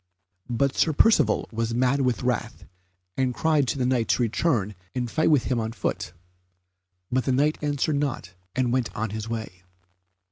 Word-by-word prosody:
But 130 Hz, +3 st, +1 dB
Sir 160 Hz, -, +2 dB
Percivale 150 Hz, -, +3 dB
was 115 Hz, 0 st, -2 dB
mad 130 Hz, +3 st, +2 dB
with 125 Hz, -3 st, 0 dB
wrath, 125 Hz, -3 st, -2 dB, 0.5 s
and 130 Hz, -2 st, 0 dB
cried 155 Hz, -4 st, +2 dB
to 115 Hz, -, -1 dB
the 130 Hz, -, 0 dB
Knight 125 Hz, -3 st, +1 dB
to 125 Hz, -, +2 dB
return 115 Hz, -, 0 dB, 0.2 s
and 120 Hz, -2 st, -2 dB
fight 160 Hz, -, +2 dB
with 145 Hz, -6 st, +4 dB
him 125 Hz, -3 st, 0 dB
on 110 Hz, 0 st, -3 dB
foot; -, -, -3 dB, 1.0 s
but 130 Hz, 0 st, +1 dB
the 130 Hz, -, +1 dB
Knight 145 Hz, +4 st, +2 dB
answered 145 Hz, 0 st, 0 dB
not 135 Hz, -11 st, -3 dB, 0.2 s
and 125 Hz, -1 st, +1 dB
went 130 Hz, -2 st, 0 dB
on 110 Hz, -1 st, -2 dB
his 110 Hz, +1 st, -5 dB
way. 110 Hz, -6 st, -5 dB
125 Hz, 175 wpm, -25 LUFS, 115-140 Hz, 1.0 s, with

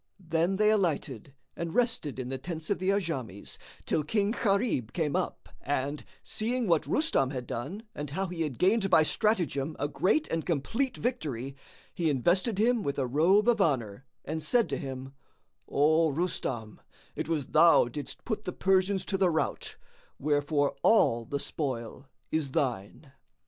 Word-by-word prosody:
Then 170 Hz, +1 st, 0 dB
they 210 Hz, +2 st, +4 dB
alighted 145 Hz, -, -1 dB, 0.2 s
and 170 Hz, +2 st, -4 dB
rested 230 Hz, -, 0 dB
in 130 Hz, -1 st, -4 dB
the 135 Hz, 0 st, -3 dB
tents 160 Hz, +4 st, -5 dB
of 200 Hz, -, +1 dB
the 185 Hz, +1 st, 0 dB
Ajams 135 Hz, -, -3 dB, 0.3 s
till 155 Hz, -, 0 dB
King 205 Hz, +6 st, +1 dB
Gharib 200 Hz, -, 0 dB
came 155 Hz, -5 st, -1 dB
up -, -, -2 dB
and, 145 Hz, +1 st, -2 dB, 0.2 s
seeing 240 Hz, +3 st, -2 dB
what 170 Hz, -5 st, +2 dB
Rustam 300 Hz, -, +2 dB
had 130 Hz, -3 st, -5 dB
done 145 Hz, -, -5 dB
and 145 Hz, -1 st, -5 dB
how 190 Hz, +8 st, -2 dB
he 175 Hz, -2 st, -5 dB
had 150 Hz, -7 st, -2 dB
gained 195 Hz, +2 st, +3 dB
by 160 Hz, -3 st, +6 dB
stratagem 160 Hz, -, 0 dB
a 145 Hz, -, -1 dB
great 195 Hz, -, +1 dB
and 165 Hz, -1 st, -1 dB
complete 230 Hz, -, -1 dB
victory, 140 Hz, -, -3 dB, 0.4 s
he 170 Hz, -4 st, 0 dB
invested 175 Hz, -, +1 dB
him 235 Hz, +2 st, +3 dB
with 140 Hz, -6 st, -2 dB
a 135 Hz, -, +1 dB
robe 170 Hz, -, +3 dB
of 230 Hz, -3 st, +4 dB
honour 130 Hz, -, 0 dB, 0.2 s
and 160 Hz, +2 st, -3 dB
said 240 Hz, +6 st, +2 dB
to -, -, -1 dB
him, 135 Hz, -2 st, -6 dB, 0.6 s
"O 155 Hz, +3 st, +3 dB
Rustam, 135 Hz, -, -3 dB, 0.3 s
it -, -, -4 dB
was 155 Hz, -5 st, 0 dB
thou 160 Hz, -3 st, +6 dB
didst 140 Hz, +4 st, -7 dB
put 215 Hz, -3 st, -3 dB
the 180 Hz, -, -3 dB
Persians 190 Hz, 0 st, +2 dB
to 195 Hz, -, -2 dB
the 190 Hz, -2 st, +4 dB
rout; 160 Hz, -2 st, -2 dB, 0.4 s
wherefore 145 Hz, 0 st, +1 dB
all 115 Hz, -, +4 dB
the 140 Hz, +5 st, -3 dB
spoil 130 Hz, -3 st, -4 dB, 0.2 s
is 155 Hz, -3 st, 0 dB
thine." 130 Hz, +1 st, -3 dB
160 Hz, 165 wpm, -29 LUFS, 135-195 Hz, 0.6 s, by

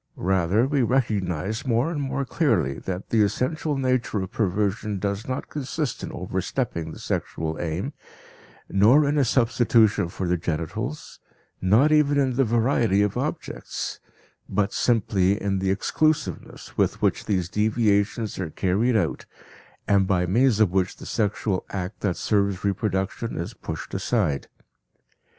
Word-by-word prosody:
Rather, 95 Hz, +4 st, +2 dB
we 140 Hz, 0 st, +1 dB
recognize 105 Hz, -, 0 dB
more 125 Hz, +5 st, +1 dB
and 150 Hz, -4 st, -2 dB
more 135 Hz, 0 st, -2 dB
clearly 115 Hz, -, +1 dB
that 95 Hz, 0 st, -5 dB
the 110 Hz, -, +4 dB
essential 135 Hz, +8 st, 0 dB
nature 130 Hz, -5 st, 0 dB
of 95 Hz, 0 st, -4 dB
perversion 105 Hz, 0 st, -1 dB
does 100 Hz, +2 st, -3 dB
not 130 Hz, 0 st, -3 dB
consist 145 Hz, -1 st, -3 dB
in -, -, -5 dB
overstepping 90 Hz, -1 st, -3 dB
the -, -, -9 dB
sexual 80 Hz, 0 st, -3 dB
aim, 85 Hz, -, -3 dB, 0.7 s
nor 120 Hz, +10 st, +5 dB
in 145 Hz, -, +1 dB
a -, -, +4 dB
substitution 115 Hz, -6 st, +3 dB
for 90 Hz, +1 st, -4 dB
the 90 Hz, 0 st, +1 dB
genitals, 85 Hz, -, -4 dB, 0.4 s
not 110 Hz, +11 st, +4 dB
even 150 Hz, -2 st, +4 dB
in 135 Hz, -2 st, +2 dB
the 135 Hz, -, +3 dB
variety 115 Hz, -3 st, +2 dB
of 105 Hz, -, -1 dB
objects, -, -, -4 dB, 0.5 s
but 100 Hz, +1 st, 0 dB
simply 100 Hz, -4 st, +2 dB
in 100 Hz, -1 st, -1 dB
the 95 Hz, 0 st, 0 dB
exclusiveness 155 Hz, +10 st, -1 dB
with -, -, +1 dB
which -, -, +1 dB
these 90 Hz, -4 st, 0 dB
deviations 105 Hz, +1 st, +1 dB
are 90 Hz, -4 st, -2 dB
carried 100 Hz, +9 st, +1 dB
out 90 Hz, -7 st, 0 dB, 0.6 s
and 100 Hz, -2 st, +3 dB
by 90 Hz, -2 st, +2 dB
means 115 Hz, +4 st, +3 dB
of 105 Hz, -5 st, +4 dB
which 95 Hz, -1 st, 0 dB
the -, -, -11 dB
sexual 105 Hz, -3 st, -1 dB
act 95 Hz, +1 st, -5 dB
that 95 Hz, -4 st, -1 dB
serves 100 Hz, -3 st, 0 dB
reproduction 100 Hz, +2 st, -1 dB
is 85 Hz, +7 st, -4 dB
pushed 80 Hz, -6 st, -7 dB
aside. 95 Hz, -, 0 dB
105 Hz, 145 wpm, -24 LUFS, 95-125 Hz, 0.7 s, nor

